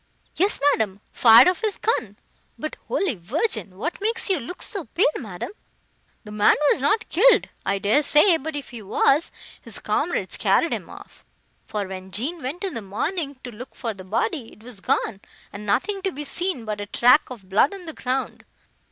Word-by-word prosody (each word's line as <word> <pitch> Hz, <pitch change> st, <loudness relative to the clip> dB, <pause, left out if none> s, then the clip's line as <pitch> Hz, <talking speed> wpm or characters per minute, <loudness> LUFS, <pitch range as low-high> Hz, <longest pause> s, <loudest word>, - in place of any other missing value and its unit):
"Yes, 390 Hz, +4 st, +2 dB
madam, 205 Hz, -6 st, -1 dB
fired 225 Hz, +4 st, +8 dB
off 365 Hz, +2 st, +1 dB
his 435 Hz, -3 st, -1 dB
gun; 225 Hz, -, -1 dB, 0.4 s
but, 310 Hz, -, -5 dB
Holy 395 Hz, -, 0 dB
Virgin! 215 Hz, -, -2 dB
what 335 Hz, -, -4 dB
makes 445 Hz, -1 st, 0 dB
you 370 Hz, -, +2 dB
look 360 Hz, +10 st, -7 dB
so 395 Hz, -5 st, -4 dB
pale, 335 Hz, -, +1 dB
madam? 200 Hz, -, -6 dB, 0.7 s
The 210 Hz, -, -10 dB
man 210 Hz, 0 st, +4 dB, 0.2 s
was -, -, +1 dB
not 425 Hz, +12 st, +1 dB
killed,—I 375 Hz, -, +3 dB
dare 205 Hz, +9 st, +3 dB
say; 305 Hz, +5 st, +5 dB
but 315 Hz, +1 st, -6 dB
if 285 Hz, -2 st, -6 dB
he 235 Hz, -2 st, -8 dB
was, 275 Hz, -, +2 dB, 0.3 s
his -, -, -4 dB
comrades -, -, -1 dB
carried -, -, +2 dB
him -, -, -5 dB
off: -, -, -13 dB, 0.4 s
for, 210 Hz, -1 st, -3 dB
when 190 Hz, 0 st, -8 dB
Jean 275 Hz, -, -2 dB
went 290 Hz, +9 st, -5 dB
in 385 Hz, -, -2 dB
the 230 Hz, -, -4 dB
morning, 280 Hz, -, -3 dB
to 245 Hz, -, -7 dB
look 240 Hz, +4 st, -11 dB
for 230 Hz, -3 st, -3 dB
the 190 Hz, -2 st, -11 dB
body, 225 Hz, -, -2 dB
it 215 Hz, -, -18 dB
was 240 Hz, -4 st, -9 dB
gone, 195 Hz, +1 st, -1 dB, 0.3 s
and 210 Hz, +1 st, -8 dB
nothing 390 Hz, -, 0 dB
to 385 Hz, 0 st, -1 dB
be 295 Hz, -2 st, -6 dB
seen 345 Hz, -5 st, -2 dB
but 210 Hz, -1 st, -4 dB
a 205 Hz, -, -5 dB
track 245 Hz, +6 st, +4 dB
of 225 Hz, -7 st, -10 dB
blood 200 Hz, +8 st, +3 dB
on 390 Hz, -3 st, -9 dB
the 320 Hz, -, -7 dB
ground. 260 Hz, 0 st, -3 dB
260 Hz, 190 wpm, -23 LUFS, 210-350 Hz, 0.7 s, fired